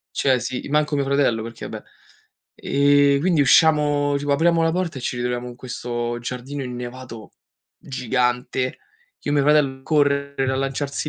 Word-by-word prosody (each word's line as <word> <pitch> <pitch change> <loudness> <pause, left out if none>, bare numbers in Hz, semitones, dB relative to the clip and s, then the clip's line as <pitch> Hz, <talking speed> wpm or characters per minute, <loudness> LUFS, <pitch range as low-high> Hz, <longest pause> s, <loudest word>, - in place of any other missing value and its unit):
Cioè 130 -2 +2
sì, 125 +1 -5
manco 150 +1 +1
mio 140 -1 +1
fratello 135 -5 +1
perché 115 +1 -8
vabbè - - -8 0.7
ehm, 140 0 +3
quindi 170 -1 +2
usciamo, 145 -1 +4
tipo 145 0 -1
apriamo 165 +3 +3
la 165 - +2
porta 175 -5 -2
e - - -8
ci 125 - -3
ritroviamo 125 0 -3
in 120 - -10
questo 120 -1 -4
giardino 125 +4 -5
innevato 125 -3 -8 0.5
gigante, 125 0 -1 0.4
ch'io - - -5
e - - +2
mio 145 - +3
fratello 140 -3 +2
correre 140 -2 +1
a - - -1
lanciarsi 135 +2 -3
135 Hz, 155 wpm, -22 LUFS, 125-145 Hz, 0.7 s, usciamo